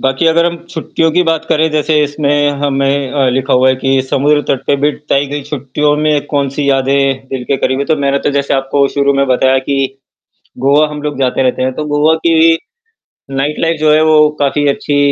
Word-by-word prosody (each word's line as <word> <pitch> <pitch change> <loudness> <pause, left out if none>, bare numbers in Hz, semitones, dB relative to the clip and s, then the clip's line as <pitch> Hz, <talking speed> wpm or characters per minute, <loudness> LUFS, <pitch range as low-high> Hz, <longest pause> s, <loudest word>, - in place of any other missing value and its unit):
बाकि 135 +4 0
अगर 165 +1 +3
हम 170 0 -2
छुट्टियों 160 0 -1
की 180 +2 +3
बात 165 -2 -1
करे, 160 +1 +2
जैसे 150 0 +1
इसमें 145 0 0
हमें 140 -1 0
अ, 135 -3 +1
लिखा 135 +2 -1
हुआ 130 +1 +4
है 130 - +3
कि 135 +1 0
समुद्र 145 +2 +2
तट 130 - -1
पे 140 - +2
बिट 150 - -1
ताई 140 +1 +1
गई 145 0 -4
छुट्टियों 145 +1 -1
में 150 -1 0
कौन-सी 140 0 -2
यादें 135 0 0
दिल 130 -2 -4
के 135 - -1
करीब 130 +1 -1
है, 140 - -1
तो 160 0 0
मैंने 140 -1 0
तो 145 - -1
जैसे 140 0 0
आपको 135 +1 +1
शुरू 140 0 +1
में 140 0 +1
बताया 130 +1 +2
कि, 135 0 -2 0.6
गोवा 145 +3 +3
हम 150 -1 -7
लोग 145 -2 -4
जाते 130 0 0
रहते 130 0 0
हैं, 130 0 0
तो 155 - -4
गोवा 150 +2 +2
की 165 0 +4 0.8
नाइट 145 +3 -2
लाइफ 165 -1 0
जो 155 0 +3
है 155 - +4
वो 155 -1 +4
काफ़ी 145 +1 0
अच्छी 145 +1 -1
140 Hz, 215 wpm, -13 LUFS, 135-150 Hz, 0.8 s, हुआ